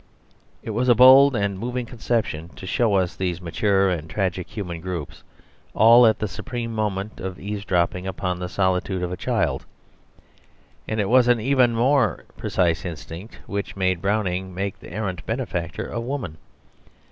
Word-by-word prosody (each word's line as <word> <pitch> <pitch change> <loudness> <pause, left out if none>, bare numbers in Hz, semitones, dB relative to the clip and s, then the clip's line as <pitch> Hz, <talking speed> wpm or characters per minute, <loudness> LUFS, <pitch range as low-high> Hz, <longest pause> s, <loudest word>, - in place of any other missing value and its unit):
It 115 - -4
was 125 +4 0
a 120 - +7
bold 130 +3 +8
and 100 -3 -1
moving 125 +2 -3
conception 110 -9 -2
to - - -9
show 105 +2 +1
us 90 -2 +1
these 90 -2 -2
mature 95 +2 +1
and 80 -2 -4
tragic 95 -2 -2
human 90 -6 -6
groups 85 -5 -6 0.5
all 115 +2 +7
at 110 - +3
the 105 - -2
supreme 115 +4 -5
moment 105 -1 -3 0.2
eavesdropping 95 -3 -1
upon 90 -1 -3
the 90 0 -4
solitude 95 0 0
of 90 - -2
a - - -2
child. - - -1 1.2
And 110 - -2
it 100 - +1
was 125 +1 +5
an 120 -1 +4
even 125 0 +3
more 120 - +2
precise 85 -2 0
instinct 85 +3 -8
which 100 0 -4
made 95 -2 0
Browning 95 -3 -1
make 100 +1 -3
the - - -12
errant 95 -2 -4
benefactor 95 -8 -3
a 120 - -3
woman. 115 - -4
100 Hz, 160 wpm, -23 LUFS, 90-115 Hz, 1.2 s, bold